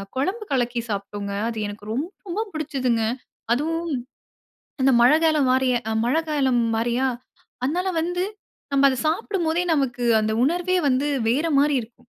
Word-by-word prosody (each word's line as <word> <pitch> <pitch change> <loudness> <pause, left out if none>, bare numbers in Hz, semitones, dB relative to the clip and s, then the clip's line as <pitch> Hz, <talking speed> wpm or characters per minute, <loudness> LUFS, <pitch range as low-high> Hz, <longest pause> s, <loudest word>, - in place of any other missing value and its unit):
குழம்பு 380 - -1
கலக்கி 240 -2 0
சாப்பிட்டோங்க. 200 0 -4 0.2
அது 225 - -5
எனக்கு 205 0 -9
ரொம்ப 350 - -4
பிடிச்சதுங்க. 260 -7 -1 0.5
அதுவும் 330 +5 -1 0.9
அந்த 270 0 +5
மழைகாலம் 305 +1 +4
மாரியே 255 -2 +2 0.3
மழைகாலம் 275 -5 +1
மாரியா 240 +3 +1 0.6
அதனால 355 +8 0
வந்து, 355 +2 -1 0.5
நம்ம 275 0 +4
அத 260 - 0
சாப்பிடும்போதே 345 -2 0
நமக்கு 250 -4 -1 0.2
அந்த 215 0 0
உணர்வே 355 +3 +1
வந்து 270 +3 +1 0.2
வேற 295 +7 +1
மாரி 290 -1 +3
இருக்கும். 230 +2 -13
275 Hz, 125 wpm, -23 LUFS, 245-330 Hz, 0.9 s, அந்த